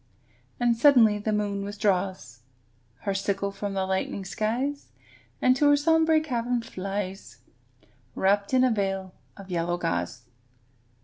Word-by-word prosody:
And 240 -1 +3
suddenly 230 -5 +5
the 215 +1 -2
moon 205 -1 -1
withdraws 190 - -2 0.6
Her 200 - -1
sickle 195 0 -1
from 200 0 -5
the 190 -1 0
lightening 190 +1 -2
skies, 250 +9 -2 0.6
And 255 0 +5
to 290 +1 +4
her 290 - +5
sombre 320 +1 +3
cavern 245 -4 -2
flies, 195 - -5 0.8
Wrapped 200 +1 +1
in 255 -1 +4
a 255 - +3
veil 195 -3 -2 0.2
of 195 -2 -11
yellow 175 0 -1
gauze. 90 - -3
205 Hz, 130 wpm, -26 LUFS, 190-245 Hz, 0.8 s, suddenly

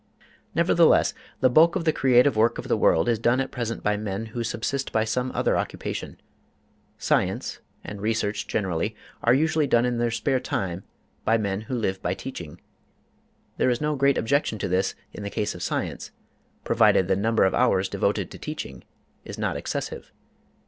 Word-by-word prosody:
Nevertheless, - - +4 0.3
the 130 - +5
bulk 165 +6 +5
of 175 -3 -1
the 160 - +3
creative 125 0 +4
work 115 +2 +3
of - - -6
the - - +2
world 80 - +3
is 115 -2 +2
done 120 +3 +2
at 135 - -2
present 115 -3 -4
by 105 0 +1
men 105 +1 -4
who 115 +2 -4
subsist 130 +4 -2
by 110 - +2
some 125 +3 -1
other - - +1
occupation. - - -4 0.8
Science, - - 0 0.2
and 100 -1 -7
research 110 -1 -1
generally, 100 +1 -1 0.3
are 120 +2 +4
usually 155 +1 +2
done 120 -1 +3
in 120 -1 -1
their 120 0 +1
spare 130 +3 0
time 95 -7 -3 0.4
by 115 - +3
men 100 -2 -2
who 110 +4 -5
live 95 -5 -2
by 90 +1 -1
teaching. 85 - -8 1.0
There - - +2
is 120 -1 +1
no 150 0 0
great 140 0 +3
objection 140 -2 +1
to 100 - -2
this 95 +1 0 0.2
in - - -8
the 100 - -4
case 105 0 -2
of - - -10
science, - - -3 0.5
provided 95 - +4
the 95 - +2
number 110 +3 +2
of 95 - +3
hours 95 -7 +2
devoted - - -1
to - - -10
teaching 65 -3 -6 0.4
is - - -8
not - - -1
excessive. - - -5
115 Hz, 180 wpm, -25 LUFS, 100-130 Hz, 1.0 s, the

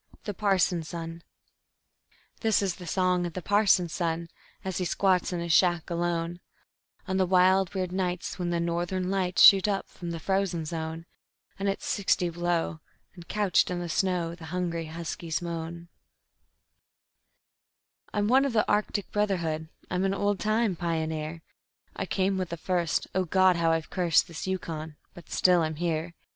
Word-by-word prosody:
The 205 - -4
Parson's 185 -5 +1
Son 165 0 -6 1.2
_This 220 -3 +2
is 190 -3 -1
the 180 - -9
song 180 -2 +1
of 170 - -8
the 185 - -4
parson's 200 -5 +3
son, 170 -1 -2 0.4
as 190 -1 -2
he - - 0
squats 185 0 +2
in 175 -1 -2
his 170 -1 0
shack 175 -1 +3
alone, 170 0 -1 0.7
On 190 -1 0
the 190 - +3
wild, 185 +1 +4
weird 185 -2 -1
nights, 180 0 -2
when 175 -1 -1
the 170 0 0
Northern 175 +2 -1
Lights 185 -2 +2
shoot 195 0 +9
up 195 -2 -1
from 175 - -8
the 165 -1 -4
frozen 190 -2 -1
zone, 160 0 -5 0.5
And 200 0 0
it's 195 - -3
sixty 185 -3 +1
below, 170 -1 -1 0.3
and 175 -2 -13
couched 205 -4 +2
in 180 - -2
the 175 - -4
snow 175 -1 0
the 170 -1 -10
hungry 170 -1 -3
huskies 165 0 -4
moan:_ 170 0 -5 2.2
"I'm 205 0 0
one 260 +4 +5
of 275 -3 -1
the 215 - +2
Arctic 205 -1 0
brotherhood, 170 -7 -1 0.2
I'm 180 0 0
an 195 0 +1
old 205 0 0
time 215 -2 +1
pioneer. 160 -1 -3 0.5
I - - -3
came 190 0 0
with 185 -2 -2
the 170 - -4
first 175 -1 0
O 185 - +1
God! 185 +1 +4
how 165 -1 +2
I've 165 -1 -1
cursed 175 -2 +3
this 170 +1 -6
Yukon 160 -4 -4 0.2
but 175 -2 -14
still 180 -2 +4
I'm 155 -1 -1
here. 170 +1 -2
175 Hz, 165 wpm, -28 LUFS, 165-190 Hz, 2.2 s, shoot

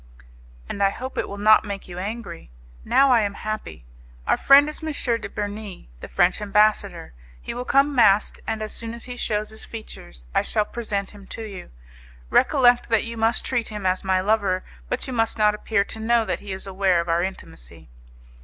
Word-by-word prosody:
"And 200 - -5
I 195 - +5
hope 255 +6 -7
it - - -2
will 200 - -6
not 215 +1 +5
make 200 -2 -6
you 180 0 -7
angry. 200 - -6 0.3
Now 275 - +4
I 240 -2 +5
am 200 -1 -2
happy. 215 - -6 0.4
Our - - +3
friend 280 +1 +6
is 305 - -7
M. 315 0 -3 0.3
de - - -6
Bernis, 205 -2 -6
the - - -8
French 180 +4 +2
ambassador. 210 - +1 0.3
He - - -6
will 245 +1 -5
come 280 +2 +3
masked, 210 -5 +3
and 220 -1 -2
as 215 - -5
soon 230 0 -6
as 235 - -7
he 250 - -7
shews 215 -3 -1
his 220 0 -5
features - - -10
I - - +3
shall 210 -1 0
present 205 -4 -4
him 200 -2 -14
to 225 - -7
you. 200 -4 -8 0.6
Recollect 245 -5 +4
that 225 - +2
you 230 0 -6
must 225 +1 +1
treat 240 -3 -1
him 210 -2 -6
as 185 0 +1
my 190 -1 +1
lover, 200 -2 +1 0.3
but - - -2
you 260 - -5
must 225 -1 0
not 210 -1 +4
appear 210 -1 0
to 220 - -7
know 230 +1 +2
that - - -2
he 200 - -8
is 190 +1 -4
aware 190 -2 +1
of 170 - -2
our 170 0 +2
intimacy." 175 - -8
215 Hz, 205 wpm, -23 LUFS, 195-230 Hz, 0.6 s, friend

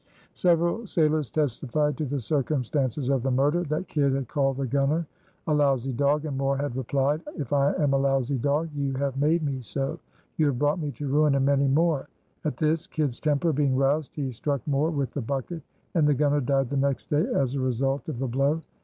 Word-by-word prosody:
Several 175 +5 +1
sailors 155 -5 +1
testified 150 0 0
to 155 - -2
the 140 +1 -2
circumstances 135 0 -1
of 135 -2 +2
the 135 - -1
murder, 140 +6 +2
that 155 +5 -2
Kidd 140 -3 +1
had 135 -2 -2
called 135 0 0
the 135 - -1
gunner 140 +5 +1 0.4
"a 155 - +1
lousy 135 -3 +2
dog" 145 +4 +1
and 145 -3 -3
Moore 135 0 0
had 140 -3 -3
replied: 135 +4 0 0.2
"If 145 -4 -4
I 140 0 +3
am 145 -2 +1
a 135 - +3
lousy 135 -1 +1
dog 145 +5 0
you 140 -2 -2
have 135 0 -2
made 160 +3 +2
me 135 -3 -2
so. 135 +3 -3 0.4
You 155 - +3
have 135 -4 0
brought 145 +5 +1
me 150 -3 -2
to 145 - -5
ruin 145 +1 +3
and 135 -1 +2
many 140 0 +3
more." 150 +1 +2 0.4
At 155 - -2
this, 155 +1 0
Kidd's 145 -6 -2
temper 155 +2 +1
being 140 -2 +1
roused, 140 +2 +1
he 140 -3 -2
struck 140 +2 -3
Moore 145 +2 +1
with 140 -5 -2
the 145 - -2
bucket, 140 +7 -4 0.3
and 160 -4 +3
the 145 - +3
gunner 145 +1 +2
died 135 0 0
the 140 - 0
next 140 0 -1
day 150 +7 +2
as 135 -2 +1
a 140 - -1
result 135 +2 -1
of 150 - -4
the 135 +2 -2
blow. 140 +6 +1
140 Hz, 215 wpm, -26 LUFS, 135-150 Hz, 0.4 s, I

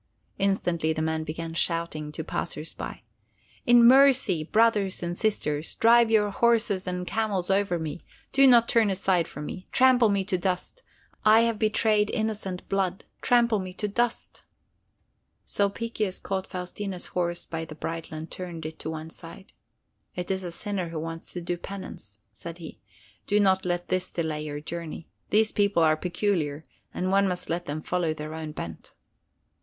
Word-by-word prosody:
Instantly 175 -5 +1
the 155 - -3
man 160 0 -1
began 165 +1 -5
shouting 165 -3 -1
to 160 - -5
the - - -19
passers 155 +2 -3
by: - - -7 0.6
"In 240 -1 +7
mercy, 260 - +6
brothers 210 0 +2
and 175 0 -2
sisters, 160 -8 -1
drive 235 0 +5
your 210 -2 +3
horses 220 -4 +2
and 180 0 -2
camels 200 -3 -1
over 195 -2 +2
me! 160 0 -5 0.3
Do 275 0 +6
not 235 -2 +6
turn 225 -3 +3
aside 185 -3 +1
for 150 - -8
me! 185 +4 -7
Trample 255 -3 +5
me 200 -1 +1
to 185 -3 0
dust! 185 - -2 0.4
I 215 +1 +7
have 230 -2 +1
betrayed 215 -1 +2
innocent 215 -5 -3
blood. 190 -1 -1 0.2
Trample 235 -3 +3
me 185 -1 -6
to 210 - -3
dust!" 235 +3 -2 1.0
Sulpicius 205 -1 -1
caught 190 -1 -3
Faustina's 185 +1 -5
horse 175 -1 -1
by 165 0 -4
the 160 -1 -9
bridle 165 0 -5
and 160 +1 -7
turned 175 -3 -6
it 160 0 -7
to - - -5
one 160 0 -6
side. 170 +4 -12 0.6
"It 180 +1 -3
is 190 0 -1
a 175 - -4
sinner 185 0 -3
who 165 -1 -4
wants 165 +1 -6
to 175 - -4
do 175 +1 -2
penance," 170 - -8
said 170 0 -8
he. 165 -3 -10 0.5
"Do 205 0 +3
not 190 -2 +3
let 175 0 -2
this 185 0 0
delay 155 -2 -3
your 145 -1 -5
journey. 165 +1 -7 0.2
These 215 +1 +3
people 200 -5 +2
are 155 -1 +5
peculiar 170 -4 -1 0.3
and 185 +1 -2
one 200 0 +4
must 180 -2 -3
let 175 +1 -2
them 155 +2 -4
follow 175 -3 0
their 155 0 -6
own 160 -1 -5
bent." 80 - -8
185 Hz, 170 wpm, -27 LUFS, 165-210 Hz, 1.0 s, In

